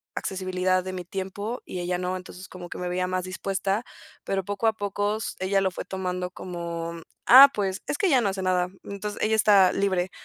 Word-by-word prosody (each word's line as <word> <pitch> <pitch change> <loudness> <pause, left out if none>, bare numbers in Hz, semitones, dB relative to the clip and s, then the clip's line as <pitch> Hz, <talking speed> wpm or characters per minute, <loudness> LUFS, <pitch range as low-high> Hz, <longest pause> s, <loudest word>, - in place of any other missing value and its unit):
accesibilidad 185 -1 0
de 185 - -5
mi 180 -1 -5
tiempo 195 +6 -5
y 180 - -5
ella 180 0 -1
no. 180 +1 -2
Entonces 185 0 -10
como 180 -1 -9
que - - -7
me 180 0 -3
veía 180 +1 -1
más 185 0 -1
dispuesta, 195 +3 -2 0.4
pero 195 -1 -1
poco 205 +3 -3
a 220 - +4
poco, 205 0 -2 0.2
ella 195 +1 +1
lo 190 -1 +1
fue - - -6
tomando 180 -1 -3
como, 170 -2 -5 0.3
ah, 270 +3 +11
pues, 195 -2 -2
es - - -1
que 400 - +2
ella 275 -7 +5
no 215 - +1
hace 190 0 -3
nada. 180 -1 +2 0.2
Entonces 205 +1 -6
ella 220 +1 +3
está 200 -4 +6
libre. 185 -2 0
190 Hz, 205 wpm, -26 LUFS, 180-200 Hz, 0.4 s, ah